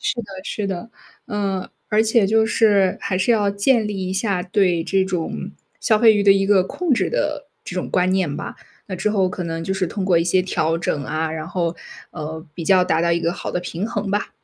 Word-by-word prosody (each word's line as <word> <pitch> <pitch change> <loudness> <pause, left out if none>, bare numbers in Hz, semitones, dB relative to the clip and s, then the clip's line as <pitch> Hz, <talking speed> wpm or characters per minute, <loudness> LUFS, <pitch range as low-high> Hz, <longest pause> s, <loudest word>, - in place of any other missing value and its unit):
是 - - -1
的 - - -10 0.2
是 205 -2 -3
的。 190 +4 -5 0.4
嗯， 195 -2 -2 0.2
而 215 +1 +4
且 220 -1 +3
就 220 +2 +3
是， 205 -4 +3
还 185 - -1
是 190 +6 +2
要 205 -3 +2
建 215 +3 +2
立 190 -3 -3
一 - - -2
下 195 -2 0
对 180 -3 +1
这 190 +2 +1
种 180 -4 -3 0.3
消 220 - +3
费 225 -2 +7
欲 205 -1 +1
的 200 - +7
一 195 0 +3
个 195 -2 +4
控 320 - -1
制 - - 0
的 290 -1 -2 0.2
这 - - -7
种 180 - -3
观 180 0 +2
念 185 -7 0
吧。 - - -6 0.3
那 185 - -3
之 190 +4 0
后 195 -3 +2
可 180 0 -5
能 165 0 -4
就 190 +3 -1
是 190 -1 0
通 190 +3 -3
过 180 -3 +4
一 165 - +2
些 185 +2 +2
调 165 -3 0
整 145 -4 -2
啊， 155 +2 -2
然 160 -1 -5
后， 170 -2 -2 0.4
呃， 160 +2 -6
比 170 - -6
较 185 +1 +4
达 160 +1 +1
到 170 - +2
一 170 - +2
个 170 0 0
好 - - -5
的 180 - -1
平 180 +2 -4
衡 205 -3 -3
吧。 205 0 -1
190 Hz, 255 characters per minute, -21 LUFS, 175-205 Hz, 0.4 s, 费